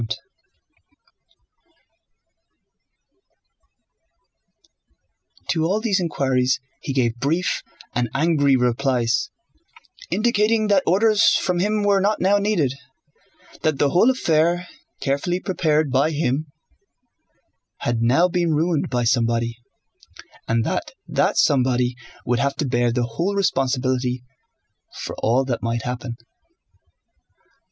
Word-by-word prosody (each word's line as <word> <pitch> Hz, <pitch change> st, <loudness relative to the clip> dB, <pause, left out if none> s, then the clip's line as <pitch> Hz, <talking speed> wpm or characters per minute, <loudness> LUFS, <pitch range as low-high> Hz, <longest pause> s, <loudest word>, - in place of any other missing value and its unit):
To 160 Hz, -2 st, 0 dB
all 195 Hz, +6 st, +1 dB
these 215 Hz, -4 st, 0 dB
inquiries 130 Hz, -7 st, 0 dB, 0.2 s
he -, -, -4 dB
gave 120 Hz, -3 st, 0 dB
brief 160 Hz, +8 st, 0 dB, 0.3 s
and 120 Hz, -1 st, -1 dB
angry 145 Hz, -2 st, +3 dB
replies 125 Hz, -1 st, +1 dB, 0.8 s
indicating 215 Hz, -1 st, +1 dB
that 200 Hz, -2 st, +4 dB
orders 210 Hz, +4 st, +4 dB
from 180 Hz, -2 st, 0 dB
him 210 Hz, +2 st, 0 dB
were 200 Hz, -1 st, +3 dB
not 205 Hz, +2 st, +1 dB
now 200 Hz, +2 st, +3 dB
needed, 190 Hz, -11 st, +1 dB, 0.9 s
that 155 Hz, -3 st, 0 dB
the 140 Hz, 0 st, +2 dB
whole 185 Hz, +8 st, +4 dB
affair, 175 Hz, -7 st, +1 dB, 0.3 s
carefully 140 Hz, +6 st, -1 dB
prepared 155 Hz, -6 st, 0 dB
by 135 Hz, +4 st, +2 dB
him, 150 Hz, -1 st, -1 dB, 1.3 s
had 120 Hz, -1 st, -1 dB
now 135 Hz, +10 st, +4 dB
been 170 Hz, -3 st, 0 dB
ruined 160 Hz, 0 st, 0 dB
by 120 Hz, -1 st, 0 dB
somebody, 115 Hz, -1 st, +1 dB, 0.9 s
and 115 Hz, 0 st, +1 dB
that -, -, -3 dB
that -, -, +1 dB
somebody 125 Hz, -2 st, +2 dB, 0.3 s
would 120 Hz, 0 st, 0 dB
have 140 Hz, +2 st, 0 dB
to 150 Hz, -, -2 dB
bear 120 Hz, -1 st, +1 dB
the 120 Hz, +1 st, 0 dB
whole 170 Hz, +13 st, -2 dB
responsibility 130 Hz, -7 st, 0 dB, 0.8 s
for -, -, -5 dB
all 125 Hz, +4 st, +2 dB
that 120 Hz, -4 st, -2 dB
might 115 Hz, 0 st, -2 dB
happen. 125 Hz, -1 st, -4 dB
140 Hz, 105 wpm, -22 LUFS, 125-180 Hz, 1.3 s, that